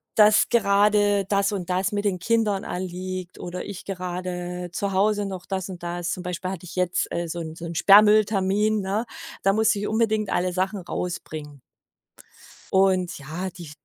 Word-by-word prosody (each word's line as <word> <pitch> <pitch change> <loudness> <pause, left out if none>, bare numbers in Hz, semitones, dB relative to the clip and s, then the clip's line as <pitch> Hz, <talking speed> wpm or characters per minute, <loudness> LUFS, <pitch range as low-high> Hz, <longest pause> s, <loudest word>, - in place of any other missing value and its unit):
dass 210 0 +6
gerade 205 -2 +3
das 200 0 +2
und 185 -3 -4
das 185 +2 0
mit 205 - -1
den 185 -3 0
Kindern 215 0 +1
anliegt 185 0 -5
oder 180 +1 -5
ich 200 -3 -8
gerade 180 -1 -4
zu 200 +1 -2
Hause 205 +1 +2
noch 190 -2 -6
das 190 -1 -3
und 180 -2 -8
das 175 0 -3
zum 180 - -4
Beispiel 180 +1 -4
hatte 185 -2 -7
ich 175 - -10
jetzt, 180 -1 0
äh, 170 0 -2
so 170 +1 -4
'n 160 0 -7
so 170 - -8
'n 170 0 -6
Sperrmülltermin, 210 +1 +5
ne? 200 +5 -1 0.4
Da 195 - +4
musste 215 0 +2
ich 205 - -2
unbedingt 220 -2 +1
alle 180 +1 +1
Sachen 190 +2 -1
rausbringen 155 -5 -5 1.1
und, 190 -2 +2
ja, 160 +7 -5
die 170 -4 -10
190 Hz, 175 wpm, -24 LUFS, 180-205 Hz, 1.1 s, dass